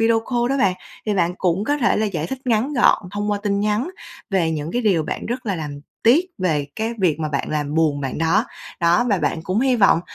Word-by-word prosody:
video 225 0 +3
call 240 0 +1
đó 275 - +1
bạn, 190 -6 +3 0.3
thì 210 - +1
bạn 180 -2 +1
cũng 185 +2 +1
có 290 +5 +1
thể 245 - +2
là 215 0 +1
giải 165 -6 -3
thích 265 - -5
ngắn 245 +4 +1
gọn 245 - +4
thông 205 0 -2
qua 205 - 0
tin 200 -1 0
nhắn 210 - 0 0.4
về 180 -4 +2
những 155 0 -3
cái 245 0 0
điều 190 -7 +3
bạn - - -4
rất 240 0 -4
là 195 -3 0
làm 145 -2 -6 0.2
tiếc 270 +11 +5
về 155 -6 0
cái 225 +2 -2
việc 165 -5 +2
mà 155 - -1
bạn 140 -2 -2
làm 150 -1 -2
buồn 155 -3 +2
bạn 135 +1 -3
đó, 165 0 +2 0.4
đó, 170 +6 +4
và 200 - +4
bạn 160 - -1
cũng 185 +6 0
hy 260 -2 +3
vọng 195 -6 +5
195 Hz, 250 wpm, -21 LUFS, 160-230 Hz, 0.4 s, tiếc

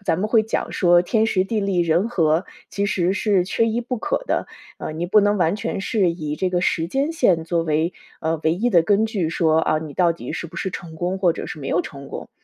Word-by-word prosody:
咱 165 -4 0
们 200 - 0
会 225 0 +4
讲 220 - -3
说 175 -1 +4
“天 220 +3 +2
时， 185 -4 +1
地 215 +2 -1
利， 195 -3 0
人 170 +5 +2
和”， 165 -6 +1 0.2
其 200 0 -1
实 185 -2 +1
是 200 -2 +1
缺 225 +5 +1
一 230 +2 -1
不 250 0 -4
可 - - -2
的。 - - -1 0.3
呃， - - -5
你 160 +2 -3
不 200 +4 +4
能 205 0 +2
完 175 -1 +2
全 205 - -3
是 200 -3 +1
以 155 -3 -4
这 185 - 0
个 180 -1 0
时 165 -3 +1
间 275 - -1
线 185 - +2
作 170 0 0
为， 160 +2 0 0.3
呃， 160 0 -1
唯 160 +1 +3
一 230 +7 0
的 175 -6 +6
根 205 +5 +2
据， 205 -7 -1
说： 160 -1 +2
“啊， 155 - +1
你 155 -2 -7
到 175 +2 +3
底 - - -7
是 - - -4
不 170 +1 -13
是 190 - -2
成 165 -2 -8
功 180 +3 -2
或 180 -3 +2
者 - - -5
是 - - -7
没 135 -2 -6
有 170 +4 +1
成 140 -4 -10
功。” - - -8
180 Hz, 275 characters per minute, -22 LUFS, 165-205 Hz, 0.3 s, 的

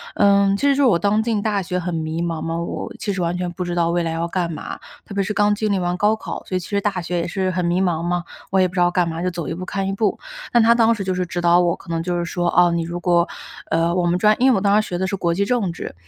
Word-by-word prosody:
嗯， 200 -1 +4
其 280 - -2
实 280 - +4
是 285 - +2
我 230 -10 +4
刚 205 +3 +2
进 220 -3 0
大 205 -2 0
学 180 0 -3
很 175 0 -3
迷 160 0 -2
茫 165 -2 -3
嘛， 165 0 -3
我 170 - -5
其 210 - -2
实 190 - -3
完 175 +1 -1
全 180 -1 -3
不 180 +1 -4
知 175 - -3
道 170 -1 +2
未 175 0 +1
来 165 - -2
要 165 +1 -2
干 175 -2 -1
嘛， 155 - -6 0.3
特 - - -9
别 200 - 0
是 210 - -3
刚 205 0 +3
经 215 0 -1
历 200 - +2
完 175 0 -1
高 210 +3 +3
考， - - -6
所 185 - -4
以 185 - +1
其 175 - -9
实 200 -1 +1
大 195 -3 -1
学 175 +1 -3
也 170 - -2
是 185 +2 -1
很 185 -1 -1
迷 175 +2 +1
茫 170 -3 0
嘛， 175 0 -1 0.3
我 190 - +3
也 185 - +4
不 180 - -12
知 180 - -1
道 175 - +4
干 175 -1 +1
嘛， 165 0 -4
就 180 - 0
走 170 -3 -5
一 - - -3
步 185 +2 -6
看 195 0 -3
一 - - -1
步。 205 0 0 0.4
但 240 - +6
她 230 +1 +6
当 230 -1 +4
时 200 - -4
就 185 - -1
是 180 0 -1
指 175 0 -4
导 175 0 +5
我， 175 -1 +2
可 - - -16
能 165 -1 -1
就 175 0 -1
是 175 - -1
说， 175 0 -2
哦， 175 -1 +6
你 170 0 0
如 170 +1 -5
果 170 0 +3 0.4
呃， 165 +1 +2
我 180 - +1
们 175 +1 +2
专 210 +3 +4
因 260 +2 +5
为 - - +3
我 195 - 0
当 205 +1 +4
时 - - -7
学 175 - -3
的 190 - -1
是 195 - -2
国 170 -2 0
际 195 +4 +1
政 230 -7 0
治， - - -7
180 Hz, 355 characters per minute, -21 LUFS, 170-200 Hz, 0.4 s, 但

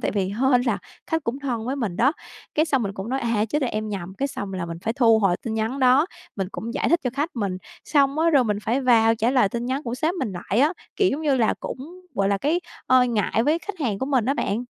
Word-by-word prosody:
tại - - 0
vì 195 -2 0 0.2
hên 260 -2 +4
là 245 - 0 0.3
khách 320 -2 -1
cũng 240 +4 -2
thân 240 -5 -3
với 270 +3 -1
mình 210 -9 -2
đó. 270 +5 +4 0.4
Cái 310 - +3
xong 270 -6 +1
mình 200 -1 -2
cũng 195 +2 -6
nói: 265 +1 -1
"À, 230 -3 +1
chết 295 - 0
rồi, 250 - +1
em 215 0 -3
nhầm." 190 -3 -5
Cái 275 - 0
xong 200 -6 -5
là 185 -2 -3
mình 165 0 -6
phải 225 - 0
thu 230 -4 +4
hồi 195 -4 +2
tin 225 -2 -3
nhắn 225 +5 -1
đó, 260 +5 +5 0.3
mình 190 -2 -2
cũng 230 +2 -5
giải - - 0
thích 340 +1 +3
cho 250 - +1
khách 295 +4 -1
mình. 195 -4 -2 0.3
Xong 280 0 +2
á, 330 +1 +4
rồi 275 -5 +4
mình 210 -2 0
phải 245 +5 0
vào 230 -3 +4
trả 225 +2 +1
lời 250 -7 +3
tin 235 +2 -4
nhắn 265 +3 -1
của 235 -1 -3
sếp 320 +7 0
mình 255 - -3
lại 190 +6 -1
á, 300 +4 +4 0.2
kiểu 390 -3 +3
giống 290 - -2
như 285 -4 +2
là 230 -3 +2
cũng, 325 +8 -7
gọi 195 0 +1
là, 200 -1 +1
cái, 320 - +1 0.3
ờ, 255 0 +5
ngại 225 -1 +1
với 310 +5 +2
khách 400 +1 -7
hàng 215 -8 -1
của 265 - -2
mình 260 -6 +2
á 275 +3 +1
bạn. 230 -2 -1
245 Hz, 280 wpm, -24 LUFS, 215-280 Hz, 0.4 s, đó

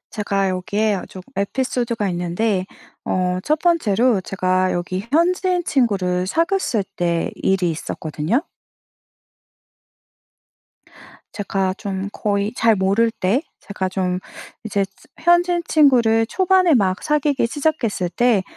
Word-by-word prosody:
제가 200 -2 -1
여기에 205 +4 0
어 190 - -5
좀 185 - -10
에피소드가 235 0 -1
있는데 185 +3 -1 0.4
어 180 0 0
1 305 +1 +1
번째로 250 - +2
제가 185 0 0
여기 185 +4 -3
현지인 360 +2 +2
친구를 190 -9 +1
사귀었을 330 - 0
때 170 -1 0
일이 185 -3 +1
있었거든요. 160 - -2 2.9
제가 195 -2 -1
좀 195 -1 -4
거의 205 0 -1
잘 225 -1 +3
모를 200 +5 +2
때 225 - 0 0.2
제가 190 -2 -4
좀 185 -1 -1 0.5
이제 200 -2 0 0.3
현지인 345 +1 +3
친구를 240 -8 +4
초반에 370 +2 +3
막 195 -5 +1
사귀기 295 -4 +1
시작했을 245 - -1
때 230 +1 +2
210 Hz, 235 characters per minute, -20 LUFS, 185-265 Hz, 2.9 s, 친구를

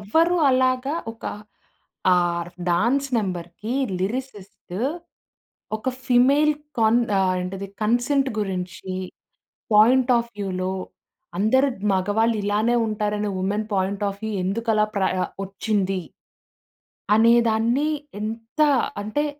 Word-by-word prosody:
ఎవరు 325 - +2
అలాగా 255 +2 +1 0.2
ఒక 225 - -16 0.9
ఆర్ 175 -1 0 0.2
డాన్స్ 245 +10 +2
నంబర్‌కి 185 +2 -4 0.3
లిరిసిస్టు 205 -3 -5 1.0
ఒక 220 - -4 0.2
ఫీమేల్ 275 +5 +4 0.3
కన్ 225 +2 +4 0.2
ఆ - - +3 0.2
ఏంటిది 195 +2 -5
కన్సెంట్ 245 +5 +2
గురించి 190 -1 -4 0.8
పాయింట్ 245 +4 +5
ఆఫ్ 235 0 -4
వ్యూలో 185 -2 -2 0.7
'అందరు 260 +7 +3 0.3
మగవాళ్ళు 215 +5 +1
ఇలానే 210 +4 +1
ఉంటారనే 210 -1 -1
వుమెన్ 205 +3 -1
పాయింట్ 195 +2 -1
ఆఫ్ 200 +1 -7
వ్యూ 220 - -2
ఎందుకు 225 +5 -1
అలా 215 0 +4
ప్రయ 190 -1 +1 0.3
వచ్చింది. 195 -1 -1 1.1
అనేదాన్ని 235 +4 +3 0.3
ఎంత 225 +5 -6 0.4
అంటే. 255 +9 -1
215 Hz, 100 wpm, -23 LUFS, 195-245 Hz, 1.1 s, పాయింట్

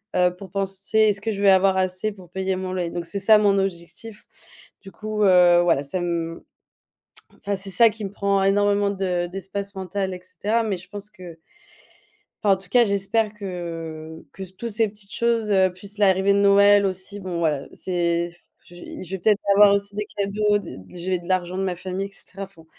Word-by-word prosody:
heu, 180 -1 +3
pour 190 +1 -11
penser, 195 +2 -2
est-ce 210 -2 +4
que 225 +2 -2
je 200 -2 -4
vais 200 -1 +6
avoir 190 0 +4
assez 185 +3 -1
pour 185 -3 -15
payer 190 0 -2
mon 185 0 -4
loyer? 180 -2 -2
Donc, 175 -1 -4
c'est 170 +4 -3
ça, 215 +3 +6
mon 200 -2 +3
objectif. 195 +4 -5 0.6
Du 195 - -11
coup, 215 +3 -4
heu, 180 -2 +6
voilà, 165 -5 +2
ça 140 +7 -3
m 170 -1 -3 1.0
enfin, 200 0 -2
c'est 195 0 -1
ça 230 +5 +6
qui 215 -1 -7
me 195 - -6
prend 200 -1 0
énormément 205 +1 +2
de 185 -3 -1
d'espace 195 +2 -6
mental, 190 0 -3
et 180 - -8
cetera. 215 +5 -1
Mais 205 -4 -2
je 180 +1 -12
pense 205 +1 -8
que 175 -5 -12 1.0
enfin, 205 -3 +4
en - - -6
tout 185 -1 -10
cas, 240 +5 +5
j'espère 205 +1 0
que 165 -5 -7
que 195 - -9
tous 235 +5 -5
ces 225 0 +2
petites 205 -1 -9
choses, 230 -2 0
heu, 190 -2 +3
plus 200 +3 -8
l'arrivée 195 -1 +3
de - - +2
Noël 200 0 +5
aussi. 190 +2 -4
Bon 185 -3 -4
voilà, 150 -4 0
c'est 170 -1 -1 0.4
je 175 - -15
je 175 0 -10
vais 190 - -2
peut-être 210 +3 +2
avoir 205 0 +7
aussi 200 0 -3
des 210 0 -3
cadeaux, 205 +1 +1
des 195 -5 -9
des 95 - -14
j'ai 180 +1 -2
de 175 - -13
l'argent 185 -1 -1
de 190 - -1
ma 185 -2 -2
famille, 185 +2 -4
et - - -22
cetera. 195 0 -11
Enfin, 185 -4 -17
195 Hz, 210 wpm, -23 LUFS, 180-205 Hz, 1.0 s, avoir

